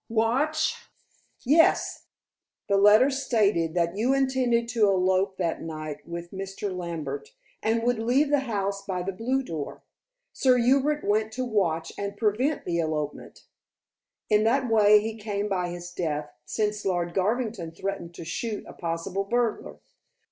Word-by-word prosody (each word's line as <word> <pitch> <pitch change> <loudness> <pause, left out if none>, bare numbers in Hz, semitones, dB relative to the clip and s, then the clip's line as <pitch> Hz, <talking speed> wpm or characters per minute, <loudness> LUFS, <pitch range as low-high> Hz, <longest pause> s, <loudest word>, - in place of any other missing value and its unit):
"Watch?" 265 +8 0 0.6
"Yes! 315 +6 +3 0.6
The 200 - +2
letter 210 +7 +6
stated 210 -11 +1
that 170 0 +1
you 245 +6 +2
intended 260 -3 +1
to 230 -3 +3
elope 190 0 +2
that 170 -3 -1
night 155 -2 -6
with 170 0 -6
Mr. 195 0 -5
Lambert, 180 - -5 0.3
and 225 +1 +1
would 245 -1 +1
leave 260 +6 +2
the 290 - +4
house 200 -2 -2
by 185 -2 -3
the 195 - -2
blue 250 +8 -1
door. 160 - -6 0.5
Sir 255 -2 +3
Hubert 275 +5 +2
went 215 +1 +1
to 255 +2 -2
watch 170 -8 0
and 200 0 -4
prevent 240 +8 0
the 170 -1 -1
elopement. 155 -2 -4 0.8
In 210 0 +3
that 255 +3 +2
way 210 -2 +6
he 220 +1 -4
came 205 -1 -3
by 180 -3 -1
his 175 0 -7
death, 150 -4 -3
since 210 -1 -1
Lord 175 -2 -1
Garvington 210 -2 -1
threatened 175 -1 -5
to 165 - -8
shoot 215 +6 -4
a - - -10
possible 170 +3 -3
burglar. 235 +1 -1
205 Hz, 150 wpm, -26 LUFS, 175-240 Hz, 0.8 s, letter